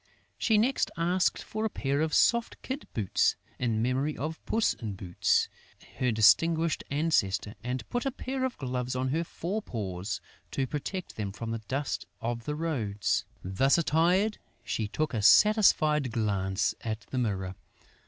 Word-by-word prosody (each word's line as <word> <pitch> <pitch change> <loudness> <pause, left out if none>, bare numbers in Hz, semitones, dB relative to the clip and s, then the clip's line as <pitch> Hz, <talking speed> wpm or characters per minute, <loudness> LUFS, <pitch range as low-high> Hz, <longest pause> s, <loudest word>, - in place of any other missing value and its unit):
She 220 -3 +3
next 250 +5 +2
asked 175 +2 +1
for 215 0 -4
a 220 - +1
pair 140 -5 -1
of 160 0 +1
soft 235 -1 +3
kid 265 +3 -5
boots, 105 -5 +2 0.2
in 115 -3 0
memory 135 +5 0
of 155 +4 -4
Puss 225 0 +2
in 110 -4 -5
Boots, 90 -2 +1 0.5
her 125 -1 +2
distinguished 160 +9 +4
ancestor, 140 -10 +1
and 125 +1 -3
put 245 +2 -1
a - - 0
pair 260 0 -4
of 260 -1 -2
gloves 125 -2 -3
on 130 +1 0
her 160 +5 0
fore 185 +5 -4
paws, 95 - -4 0.3
to 135 - -1
protect 155 +7 -5
them 100 -3 -3
from 115 +3 -5
the 115 -1 -3
dust 140 +2 -2
of 115 0 -3
the 150 - -2
roads. 110 -11 -1 0.2
Thus 95 - +3
attired, 175 +6 +2 0.2
she 110 - -2
took 155 +7 -2
a 110 - 0
satisfied 155 - +5
glance 100 -3 0
at 110 -1 -3
the 130 - 0
mirror. 95 -6 -1
135 Hz, 160 wpm, -29 LUFS, 110-170 Hz, 0.5 s, satisfied